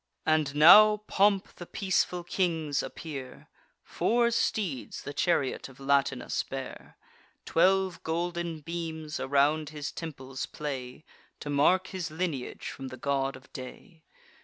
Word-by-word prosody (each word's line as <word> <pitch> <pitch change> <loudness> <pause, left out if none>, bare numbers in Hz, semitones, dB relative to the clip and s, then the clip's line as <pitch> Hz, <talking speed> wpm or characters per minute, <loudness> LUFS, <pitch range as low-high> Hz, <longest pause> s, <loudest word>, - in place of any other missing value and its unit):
And 155 -2 +2
now 210 +8 +9
in 210 - -4
pomp 200 -1 +2
the 175 - -9
peaceful 185 -3 0
kings 165 -5 0
appear: 135 -5 -8 0.3
Four 235 0 +1
steeds 190 - -2
the 145 - -6
chariot 145 -4 0
of 135 - -17
Latinus 135 -2 +1
bear; 135 -1 -8 0.5
Twelve 190 +2 +2
golden 170 0 -3
beams 160 -1 -5
around 145 +3 +2
his 150 -2 -5
temples 135 -5 -6
play, 135 -2 -6 0.4
To 145 - -4
mark 180 +7 +3
his 180 -4 -4
lineage 155 -5 -4
from 135 - -6
the 130 0 -8
God 135 0 -1
of 130 - -16
Day. 160 - -10
155 Hz, 130 wpm, -29 LUFS, 140-175 Hz, 0.5 s, now